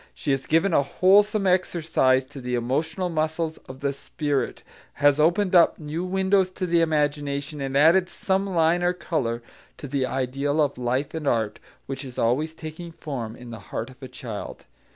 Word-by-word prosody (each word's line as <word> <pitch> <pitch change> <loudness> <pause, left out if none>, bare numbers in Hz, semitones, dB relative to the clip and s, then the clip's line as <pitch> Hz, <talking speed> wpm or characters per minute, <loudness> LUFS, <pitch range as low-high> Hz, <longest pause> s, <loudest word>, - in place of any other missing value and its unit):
She - - -2
has 135 0 -1
given 165 +4 +3
a - - +5
wholesome 200 +7 +3
exercise 160 -8 +2
to 140 0 -10
the 125 0 -2
emotional 150 +10 -1
muscles 160 0 -2
of 130 +1 -9
the 140 0 0
spirit, 140 -1 -3 0.3
has 145 0 +3
opened 180 +5 +3
up 175 -2 +6
new 155 +3 -4
windows 190 0 +2
to 185 - -1
the 170 -1 +3
imagination, 145 -2 -1
and 135 0 -1
added 170 +5 +5
some 195 +1 -1
line 170 -1 +2
or 175 0 +2
colour 120 -10 -2 0.3
to 145 - -7
the 135 -1 -1
ideal 135 +3 -1
of 145 -4 +1
life 130 +4 -1
and 160 -3 -4
art 110 -4 0 0.3
which 135 +1 -5
is 130 -2 -10
always 150 +8 +1
taking 160 +2 -8
form 125 -9 -6
in 125 -1 -11
the 115 - -7
heart 120 +4 -4
of 130 - -19
a 130 - -7
child. 120 -4 -7
150 Hz, 180 wpm, -25 LUFS, 130-170 Hz, 0.3 s, up